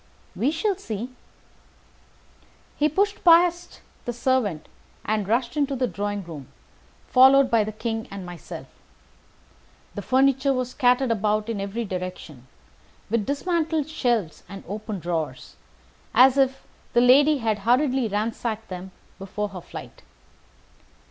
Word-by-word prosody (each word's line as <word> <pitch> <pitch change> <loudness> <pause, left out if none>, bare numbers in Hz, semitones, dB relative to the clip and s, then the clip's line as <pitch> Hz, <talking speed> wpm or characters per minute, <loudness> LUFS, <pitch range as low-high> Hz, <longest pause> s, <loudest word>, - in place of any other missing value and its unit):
"We 255 - +1
shall 355 +6 0
see." 235 - -5 1.6
He 300 +1 +2
pushed 405 +6 0
past 345 0 +4 0.2
the 240 - -3
servant 235 - 0 0.4
and 215 -2 -1
rushed 235 +3 0
into 285 -2 0
the 255 0 0
drawing 205 -3 -3
room, 155 -6 -9 0.6
followed 265 +1 +6
by 230 -2 +4
the 215 - -4
King 225 +1 -4
and 195 -2 -7
myself. 175 -1 -9 1.3
The - - -5
furniture 270 +1 +2
was 255 -1 -2
scattered 250 0 +2
about 215 0 0
in 215 -3 -2
every 205 +4 -3
direction, 180 - -7 0.6
with 225 -3 0
dismantled 315 0 0
shelves 240 - -1
and 195 0 -9
open 210 0 -5
drawers, 170 -2 -4 0.6
as 260 +1 +7
if 270 -1 +1 0.3
the 240 - +5
lady 285 +5 +6
had 220 -4 -1
hurriedly 250 +3 +2
ransacked 220 +1 -3
them 185 0 -7 0.3
before 205 +2 -4
her 185 -3 -8
flight. - - -10
235 Hz, 130 wpm, -24 LUFS, 205-270 Hz, 1.6 s, as